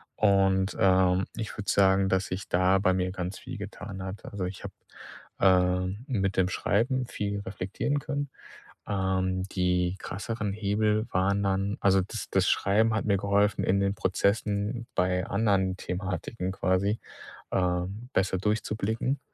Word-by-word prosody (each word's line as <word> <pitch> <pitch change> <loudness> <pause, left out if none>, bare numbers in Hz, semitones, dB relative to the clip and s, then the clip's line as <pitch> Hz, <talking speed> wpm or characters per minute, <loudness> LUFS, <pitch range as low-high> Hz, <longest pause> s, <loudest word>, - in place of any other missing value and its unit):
Und, 95 -1 +3
ähm, 95 0 +4
ich 110 -2 -5
würde 105 -2 -4
sagen, 95 0 +4
dass 95 0 +1
sich 95 +2 -5
da 95 +2 +3
bei 95 -1 +3
mir 90 0 0
ganz 95 0 -4
viel 125 0 -7
getan 100 -1 -7
hat. 95 +2 -6
Also, 100 -3 -4
ich 90 +1 -6
habe, - - -7 0.7
ähm, 90 +3 +2
mit 100 -8 -1
dem 95 -1 +4
Schreiben 125 +7 0
viel 100 -3 -3
reflektieren 100 +9 -2
können. 145 -1 -3 0.6
Ähm, 95 -2 0
die 90 -1 0
krasseren 105 +2 -4
Hebel 105 +1 +1
waren 100 +2 +2
dann 95 +1 0
also 95 -1 +4
das 90 - -6
das - - +2
Schreiben 110 +3 +3
hat 110 - -1
mir 100 -2 +3
geholfen, 100 +1 +2
in 100 +1 +2
den 100 0 +1
Prozessen 105 +4 0
bei 90 0 +1
anderen 100 -3 +1
Thematiken 90 +2 -3
quasi, 95 +3 0 0.5
ähm, 90 +6 -1
besser 95 0 +1
durchzublicken. 110 +5 -1
100 Hz, 145 wpm, -28 LUFS, 95-105 Hz, 0.7 s, ähm